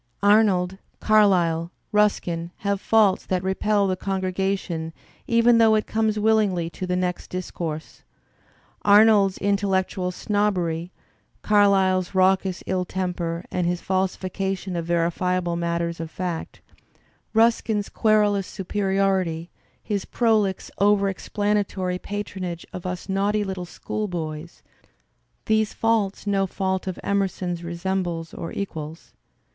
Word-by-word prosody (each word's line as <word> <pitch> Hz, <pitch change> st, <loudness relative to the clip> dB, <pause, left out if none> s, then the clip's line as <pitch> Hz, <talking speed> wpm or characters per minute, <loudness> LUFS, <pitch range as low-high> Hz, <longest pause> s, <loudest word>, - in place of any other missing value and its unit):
Arnold, 195 Hz, -3 st, +3 dB, 0.2 s
Carlyle, 180 Hz, -6 st, +3 dB, 0.2 s
Ruskin 175 Hz, -5 st, +1 dB
have 200 Hz, -1 st, -1 dB
faults 215 Hz, -4 st, +3 dB
that 185 Hz, -1 st, -1 dB
repel 200 Hz, +2 st, +1 dB
the 190 Hz, -1 st, 0 dB
congr^ation 190 Hz, -3 st, -2 dB, 0.3 s
even 230 Hz, 0 st, +4 dB
though 220 Hz, -1 st, +6 dB
it 215 Hz, -, +1 dB
comes 220 Hz, -1 st, 0 dB
willingly 205 Hz, -6 st, +2 dB
to 185 Hz, -, -5 dB
the 180 Hz, -, 0 dB
next 180 Hz, -1 st, -2 dB
discourse. 170 Hz, -3 st, -5 dB, 0.8 s
Arnold's 205 Hz, -2 st, +5 dB
intel 200 Hz, 0 st, 0 dB
lectual 190 Hz, -1 st, 0 dB
snobbery, 180 Hz, -4 st, -1 dB, 0.5 s
Carlyle's 195 Hz, -3 st, +3 dB
raucous 190 Hz, 0 st, +2 dB
ill 185 Hz, -1 st, 0 dB
temper 175 Hz, -2 st, -3 dB
and 180 Hz, -1 st, 0 dB
his 175 Hz, 0 st, 0 dB
falsifi 185 Hz, 0 st, -2 dB
cation 190 Hz, -1 st, -3 dB
of 170 Hz, -1 st, -3 dB
verifiable 175 Hz, +1 st, 0 dB
matters 170 Hz, 0 st, -2 dB
of 165 Hz, -1 st, -5 dB
fact, 175 Hz, -1 st, -5 dB, 0.7 s
Ruskin's 225 Hz, -2 st, +2 dB
querulous 210 Hz, -3 st, +2 dB
superiority, 190 Hz, -3 st, -1 dB, 0.3 s
his 205 Hz, -3 st, -2 dB
prolix 215 Hz, -5 st, +1 dB
over 200 Hz, 0 st, +4 dB
explanatory 195 Hz, -2 st, -1 dB
patronage 185 Hz, -4 st, -5 dB
of 180 Hz, 0 st, -5 dB
us 180 Hz, 0 st, -5 dB
naughty 200 Hz, +2 st, +1 dB
little 190 Hz, -2 st, -4 dB
schoolboys 170 Hz, -4 st, -5 dB, 0.4 s
— -, -, -46 dB
^these 220 Hz, -1 st, +1 dB
faults 220 Hz, -4 st, 0 dB
no 195 Hz, -1 st, +1 dB
fault 190 Hz, 0 st, -2 dB
of 185 Hz, -, -4 dB
Emerson's 190 Hz, -3 st, -1 dB
resembles 170 Hz, -1 st, -3 dB
or 165 Hz, -, -6 dB
equals. 160 Hz, -5 st, -6 dB
190 Hz, 120 wpm, -24 LUFS, 175-205 Hz, 0.8 s, though